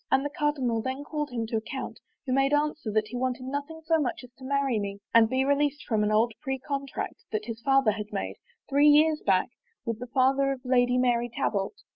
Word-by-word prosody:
And 265 +1 +2
the 290 - -2
cardinal 275 -7 0
then 260 +4 -4
called 295 0 -3
him 235 -3 -3
to 225 0 -2
account, 260 +4 -5 0.3
who 255 - -1
made 270 +2 +3
answer 295 -5 -1
that 215 0 0
he - - -7
wanted 255 0 -2
nothing 285 +4 -5
so 325 0 +3
much 250 -2 -2
as 250 - -13
to - - -12
marry 275 -3 0
me 200 -1 -4 0.2
and 225 -1 +6
be 260 +2 +1
released 285 +1 +1
from 220 -3 +1
an 210 - +1
old 220 +2 +3
pre 265 -3 -2
contract 275 0 -5
that 215 -1 -2
his 230 0 -6
father 270 -2 +4
had 210 0 -6
made, 200 - -4 0.3
three 285 +1 +4
years 300 +1 +5
back, 190 +3 +2 0.4
with 230 -1 -3
the 250 - -6
father 270 +2 +2
of 260 - -9
Lady 250 -1 +3
Mary 240 -1 +2
Talbot. 225 - -2
260 Hz, 220 wpm, -27 LUFS, 230-280 Hz, 0.4 s, and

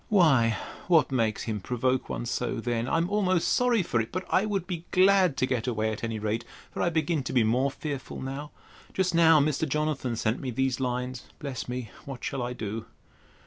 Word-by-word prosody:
Why 135 - +4 0.3
what 165 -5 +4
makes 115 -4 0
him 110 -2 -2
provoke 125 +5 -1
one - - -3
so, 125 -1 -2
then?—I'm 120 +8 0
almost 185 -3 +1
sorry 245 -5 +3
for 120 -8 +1
it; 115 - -6
but 185 +1 -3
I 200 +3 +3
would 195 -4 -1
be 175 -2 -5
glad 185 -4 +4
to - - +2
get 125 -2 -1
away 110 -2 0
at 110 - -6
any 115 -1 -2
rate. 110 +2 -2 0.3
For - - -4
I - - +3
begin 160 -1 0
to 135 - -5
be 125 -3 +4
more 125 +5 +2
fearful 140 -1 -5
now. 135 +3 -5 0.5
Just 185 -1 +1
now 165 -2 +6
Mr. 150 +1 +1
Jonathan 150 -4 -1
sent 110 +2 0
me 130 - -4
these 130 +1 0
lines—(Bless 125 +1 -4
me! 125 -3 -4
what 135 -3 -7
shall 135 - -2
I 120 0 -2
do?) 110 0 -5
130 Hz, 195 wpm, -28 LUFS, 120-165 Hz, 0.5 s, now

